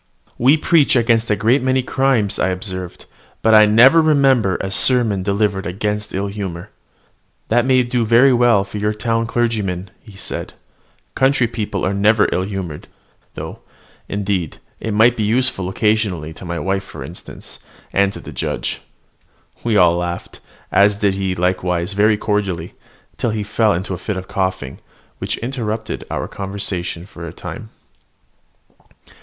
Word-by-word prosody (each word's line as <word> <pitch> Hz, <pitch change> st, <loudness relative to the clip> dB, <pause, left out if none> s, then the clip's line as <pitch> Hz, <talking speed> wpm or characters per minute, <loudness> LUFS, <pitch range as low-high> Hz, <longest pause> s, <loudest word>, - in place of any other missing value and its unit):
"We 135 Hz, +6 st, +5 dB
preach 155 Hz, -3 st, +3 dB
against 115 Hz, -1 st, +2 dB
a 105 Hz, -, +3 dB
great 120 Hz, +6 st, +2 dB
many 130 Hz, 0 st, +1 dB
crimes," 130 Hz, -6 st, +1 dB
I -, -, +2 dB
observed, 95 Hz, -1 st, -6 dB, 0.4 s
"but 110 Hz, -, +4 dB
I 110 Hz, 0 st, +8 dB
never 125 Hz, +10 st, +6 dB
remember 135 Hz, -, +3 dB
a 95 Hz, -, -4 dB
sermon 115 Hz, -3 st, +3 dB
delivered 100 Hz, -1 st, 0 dB
against 105 Hz, +3 st, -3 dB
ill 100 Hz, +1 st, -2 dB
humour." 95 Hz, -4 st, -6 dB, 0.8 s
"That 120 Hz, +2 st, +2 dB
may 130 Hz, -1 st, +4 dB
do 120 Hz, 0 st, 0 dB
very 120 Hz, +4 st, +5 dB
well 120 Hz, -5 st, +4 dB
for 100 Hz, +1 st, -7 dB
your 105 Hz, +1 st, 0 dB
town 115 Hz, +2 st, -1 dB
clergymen," 105 Hz, -6 st, -1 dB, 0.2 s
said -, -, -5 dB
he: -, -, -22 dB, 0.6 s
"country 130 Hz, -1 st, +3 dB
people 105 Hz, -4 st, -3 dB
are 95 Hz, -, 0 dB
never 105 Hz, +2 st, +3 dB
ill -, -, 0 dB
humoured; 95 Hz, -6 st, -5 dB, 0.5 s
though, -, -, -7 dB, 0.5 s
indeed, 100 Hz, -5 st, -2 dB, 0.2 s
it 110 Hz, -2 st, -3 dB
might 115 Hz, +3 st, +5 dB
be 110 Hz, -, -3 dB
useful, 110 Hz, -3 st, +1 dB
occasionally, 100 Hz, -6 st, 0 dB
to 95 Hz, -, -11 dB
my 85 Hz, 0 st, -4 dB
wife 95 Hz, +2 st, -1 dB
for -, -, -9 dB
instance, -, -, -10 dB, 0.3 s
and 100 Hz, 0 st, +3 dB
the -, -, -9 dB
judge." -, -, -3 dB, 0.8 s
We 115 Hz, -3 st, +1 dB
all 85 Hz, -3 st, +5 dB
laughed, 85 Hz, 0 st, -5 dB, 0.3 s
as 100 Hz, +1 st, +4 dB
did 100 Hz, -1 st, +1 dB
he 95 Hz, -1 st, -2 dB
likewise 90 Hz, 0 st, -1 dB
very 105 Hz, +1 st, +3 dB
cordially, 100 Hz, -6 st, -2 dB, 0.4 s
till 120 Hz, -, -1 dB
he 105 Hz, -1 st, -2 dB
fell 105 Hz, +1 st, +1 dB
into 95 Hz, +2 st, -2 dB
a 90 Hz, -, -5 dB
fit 100 Hz, +1 st, -4 dB
of 95 Hz, 0 st, -6 dB
coughing, 95 Hz, -8 st, -3 dB, 0.4 s
which -, -, -3 dB
interrupted 115 Hz, -4 st, -4 dB
our -, -, -3 dB
conversation 95 Hz, -3 st, -4 dB
for 85 Hz, -3 st, -9 dB
a -, -, -7 dB
time. 110 Hz, +6 st, -8 dB
105 Hz, 155 wpm, -19 LUFS, 95-115 Hz, 0.8 s, I